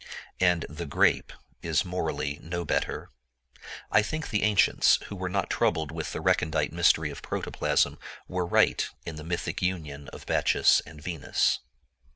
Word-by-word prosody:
And 90 -2 +3
the 80 +2 -7
grape 70 - +2 0.3
is 80 0 +1
morally 90 -5 -2
no 85 +1 -4
better. - - -2 0.8
I 105 - +6
think 155 +9 -4
the 105 - +1
ancients, 105 -2 +4
who 100 - -6
were 95 -1 -3
not 95 0 -1
troubled 80 -2 +1
with 80 0 -4
the - - -4
recondite 75 -1 +1
mystery 80 -3 +3
of 70 - -9
protoplasm, - - 0 0.3
were 90 -1 -2
right - - +3 0.2
in 80 -2 -6
the 75 - -7
mythic 85 +2 -3
union 75 -7 -3
of - - -11
Bacchus - - +4
and 80 -1 -12
Venus. 80 -1 0
85 Hz, 155 wpm, -27 LUFS, 75-90 Hz, 0.8 s, I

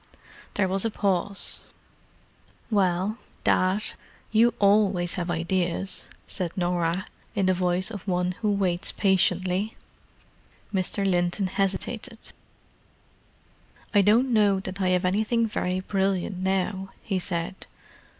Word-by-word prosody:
There 195 -2 +2
was 190 +1 0
a 225 - +1
pause. 200 -2 0 1.1
"Well, 195 +2 +1 0.2
Dad—you 215 +4 +1
always 200 -4 +3
have 175 -1 -3
ideas," 175 +2 -1 0.2
said 175 -1 -4
Norah, 175 +1 0 0.3
in 200 -2 +2
the 185 - +4
voice 180 +2 0
of 205 -2 -8
one 180 -1 +1
who 210 -2 +2
waits 185 -3 0
patiently. 190 +1 +1 1.0
Mr. 195 +1 0
Linton 175 +2 +1
hesitated. 195 +5 -2 1.8
"I 205 - +6
don't 235 +6 +4
know 205 -3 +4
that 195 +1 -5
I 185 - +2
have 180 0 +2
anything 220 +5 +2
very 185 -4 -1
brilliant 190 -1 0
now," 190 +1 -1
he 195 -3 -1
said. 175 +1 -4
190 Hz, 110 wpm, -26 LUFS, 180-205 Hz, 1.8 s, I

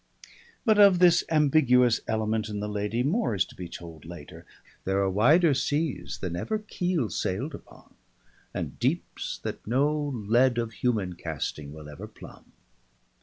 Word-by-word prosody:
But 215 -3 +4
of 200 -3 +7
this 175 -1 +5
ambiguous 135 -6 +4
element 110 0 -1
in 105 -1 -4
the 105 - -3
lady, 105 +3 -1
more 165 - +1
is 95 - +2
to - - -15
be 90 -2 -7
told 85 -2 -10
later. 85 -3 -11 0.4
There 95 +1 0
are 100 -1 +2
wider 150 - +5
seas 145 +2 -1
than 90 -3 -4
ever 215 - -2
keel 180 - -2
sailed 130 +12 -2
upon, - - -13 0.6
and - - -5
deeps - - -2
that - - -6
no 140 +6 +2
lead 120 0 +2
of 115 -1 -1
human 105 -5 -1
casting 75 -3 -5
will 75 0 -10
ever 75 -1 -9
plumb. - - -14
115 Hz, 155 wpm, -27 LUFS, 95-150 Hz, 0.6 s, of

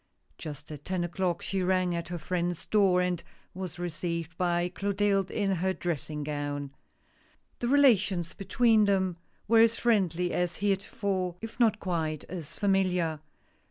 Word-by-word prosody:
Just 145 -1 -8
at 145 -1 -8
ten 185 -1 -1
o'clock 175 0 -1
she 195 -1 -1
rang 185 -1 +2
at 170 0 -3
her 175 0 -4
friend's 175 +1 -2
door, 195 -4 +4
and 180 -2 0 0.3
was 185 -2 -6
received 170 -1 -3
by 175 0 +1
Clotilde 195 +1 0
in 200 -2 0
her 190 +3 0
dressing 155 -4 -3
gown. 145 -1 -3 0.9
The 240 - -1
relations 210 - +3
between 215 +2 +3
them 190 -3 +1 0.3
were 230 +1 +5
as 230 0 +6
friendly 180 -7 +1
as 180 -1 0
heretofore, 195 -2 -1
if 225 +3 -8
not 220 -3 +4
quite 160 -4 -2
as 165 -4 -7
familiar. 180 -5 +1
180 Hz, 145 wpm, -29 LUFS, 170-200 Hz, 0.9 s, as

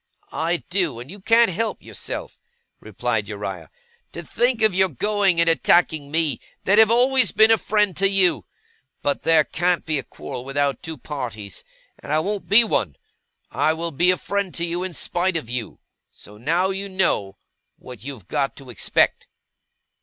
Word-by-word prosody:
'I 170 +2 -1
do, 175 -10 0
and 125 +6 -9
you 205 - -10
can't 230 +2 +4
help 225 +6 -3
yourself,' - - -7 0.4
replied - - -3
Uriah. - - -6 0.4
'To - - -8
think 240 -2 0
of 215 -3 +4
your 190 +1 +3
going 195 - +1
and 170 - +3
attacking 165 -3 +2
me, 160 -1 0 0.2
that 205 +3 +4
have 220 -1 +7
always 250 +2 +4
been 220 +1 +5
a 225 - +6
friend 210 -4 +1
to 195 +1 +3
you! 190 -3 +2 0.6
But 145 - -1
there 165 -1 +4
can't 175 +1 -1
be 155 -3 0
a - - -6
quarrel 130 -3 -8
without 140 +1 -1
two 160 -1 -7
parties, 115 - -7 0.4
and 145 - -8
I 155 - +3
won't 200 +4 -3
be 215 +4 +7
one. 95 - -1 0.6
I 155 - +1
will 165 +1 -4
be 175 +5 +2
a 185 - +3
friend 200 -2 -3
to 170 - -1
you, 175 +1 -3
in 185 -3 -5
spite 175 +3 -1
of 120 -7 -7
you. 120 -3 -5 0.3
So 105 - -14
now 165 - 0
you 195 +1 -5
know 135 - 0 0.4
what 125 -4 -12
you've 130 -9 -8
got 140 -2 -1
to 135 -3 -11
expect. 110 - 0
170 Hz, 175 wpm, -22 LUFS, 140-195 Hz, 0.6 s, have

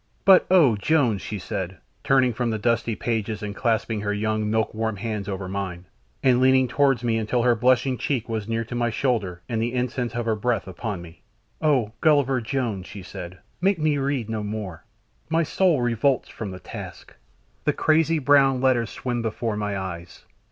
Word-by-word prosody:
But 190 -2 +7
"Oh! 160 -11 +5
Jones," 120 -4 +2
she 105 - -5
said, 95 -1 -4 0.3
turning 130 -2 +3
from 120 +1 -1
the 110 - -1
dusty 115 +1 0
pages 110 -2 -2
and 105 -1 -4
clasping 115 -2 0
her 105 0 -1
young, 110 +1 -1
milk 110 0 0
warm 110 0 -2
hands 105 -1 -4
over 95 -1 -4
mine 95 -2 -4 0.4
and 125 -1 +4
leaning 130 0 +5
towards 135 0 +2
me 115 -2 +1
until 115 +2 0
her 120 0 +5
blushing 125 +2 +2
cheek 130 -5 -1
was 110 -3 -3
near 115 0 0
to 120 - -8
my 120 -1 0
shoulder 110 -8 -1
and 115 -2 -1
the 120 +2 -1
incense 125 -1 -2
of 120 -1 -2
her 110 -1 +1
breath 105 -2 -1
upon 95 -1 -5
me. 80 -1 -14 0.4
"Oh! 135 -9 +2
Gulliver 140 -5 +3
Jones," 115 -6 -2
she 100 -2 -9
said. 90 -1 -8 0.2
"Make 195 +1 +3
me 155 -2 +1
read 135 -4 -1
no 110 -1 -3
more; 105 -5 -5 0.4
my 165 +1 +2
soul 165 -4 +2
revolts 120 +2 +1
from 110 - -6
the 95 -1 -8
task, - - -9 0.5
the - - +4
crazy 160 +1 +2
brown 135 -2 +4
letters 125 -3 +2
swim 120 -2 -3
before 115 0 -2
my 105 -1 -2
eyes. 95 -1 -7
115 Hz, 185 wpm, -24 LUFS, 105-130 Hz, 0.5 s, But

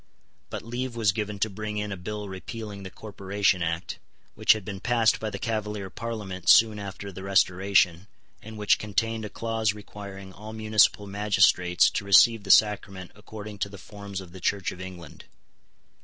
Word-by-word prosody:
But - - -6
leave 120 +2 -4
was 110 -4 +3
given 105 0 -4
to 110 - +3
bring 105 +1 -5
in 105 0 -3
a - - -3
bill 105 +3 -6
repealing 100 +2 -7
the 95 - -7
Corporation 100 -2 -1
Act, 85 +1 -3 0.3
which - - +5
had 110 -3 -7
been 100 -1 -6
passed 115 0 +2
by 110 - -3
the 100 - -5
Cavalier 105 -3 -3
Parliament 105 -6 -5
soon 110 -2 +6
after 100 0 -7
the 95 0 -9
Restoration, 95 -1 +2 0.3
and 110 0 -10
which 105 -1 +3
contained 110 +1 -1
a - - -6
clause 115 -2 -1
requiring 100 -2 -10
all 110 +3 -10
municipal 110 -1 +3
magistrates 95 -3 +3
to - - -2
receive 100 +3 +6
the 100 - -11
sacrament 100 -3 +3
according 105 -1 -10
to 100 - -1
the 100 - -10
forms 100 0 -8
of 90 -2 -12
the 95 0 -11
Church 100 +1 0
of 90 - -10
England. 90 -4 -10
100 Hz, 175 wpm, -26 LUFS, 95-110 Hz, 0.3 s, soon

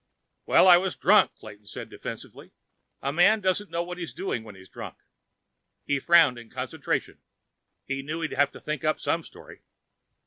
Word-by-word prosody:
"Well, - - +6
I 175 -1 +9
was 185 +1 -2
drunk," 210 +3 +4
Clayton 105 -1 -13
said - - -8
defensively. - - -9 0.5
"A 140 +1 -1
man 195 +7 +5
doesn't 190 +1 -1
know 170 0 -2
what 180 +1 -7
he's 170 - -6
doing 180 -12 -3
when 105 -3 -12
he's 95 0 -15
drunk." - - -9 0.9
He 140 -1 0
frowned 165 -6 +5
in 115 -1 -13
concentration. - - -3 0.7
He 135 0 -3
knew 155 +4 -5
he'd 160 - -3
have 140 0 +2
to - - -11
think 150 -1 -4
up 155 0 +1
some 170 - 0
story. - - -14
160 Hz, 175 wpm, -26 LUFS, 135-180 Hz, 0.9 s, I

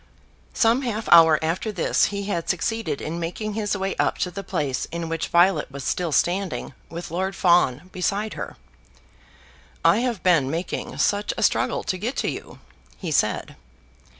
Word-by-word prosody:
Some 230 +3 +3
half 225 -4 -3
hour 165 -2 +8
after 175 +7 -1
this 190 -5 +2
he 200 -1 -3
had 185 -5 -3
succeeded 225 0 -1
in 165 +2 -4
making 195 +6 -4
his 205 -1 -1
way 195 0 -2
up - - +1
to 180 - -7
the 200 +3 -6
place 145 -9 -2
in 170 0 -5
which 165 0 -2
Violet 175 -2 +3
was 140 0 -7
still 175 +3 -1
standing, 180 +6 0 0.2
with 170 -1 -7
Lord 190 +3 -2
Fawn 175 -5 +3
beside 200 +4 -1
her. - - -7 1.3
"I - - +5
have 240 -4 -2
been 165 -8 +4
making 165 +5 -4
such 205 0 +1
a - - -1
struggle - - +1
to 185 -3 -2
get 235 +7 -3
to - - 0
you," - - -9 0.4
he 175 -5 -5
said. 105 -7 0
180 Hz, 170 wpm, -24 LUFS, 165-205 Hz, 1.3 s, hour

